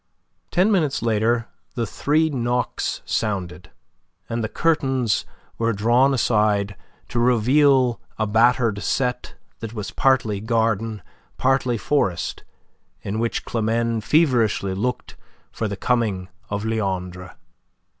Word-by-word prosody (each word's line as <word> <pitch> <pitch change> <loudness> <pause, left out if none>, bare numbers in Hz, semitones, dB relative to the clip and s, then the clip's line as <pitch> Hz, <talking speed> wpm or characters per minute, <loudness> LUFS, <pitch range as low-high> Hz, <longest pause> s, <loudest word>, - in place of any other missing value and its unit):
Ten 185 +5 +3
minutes 155 - +1
later 115 +1 +1 0.3
the 120 - -1
three 155 +6 +1
knocks 125 -2 -2
sounded, 90 -4 -3 0.6
and 115 0 -2
the 110 - -2
curtains 135 -9 +1 0.3
were 115 0 +1
drawn 120 +6 +3
aside 105 -5 +1 0.3
to 120 - -1
reveal 125 +1 +3 0.2
a 110 - 0
battered 115 0 +2
set 125 +6 -1 0.2
that 115 -1 -6
was 105 -2 -5
partly 120 -7 +2
garden, 110 -2 0 0.3
partly 130 -2 +1
forest, 95 -9 -1 0.6
in 105 +3 -3
which 115 0 -2
Climene 115 0 0
feverishly 115 - +2
looked 125 +6 -3 0.3
for 110 - -3
the 100 -1 -5
coming 105 -5 0 0.2
of 100 +1 -3
Leandre. 90 -5 -3
115 Hz, 115 wpm, -22 LUFS, 105-125 Hz, 0.6 s, Ten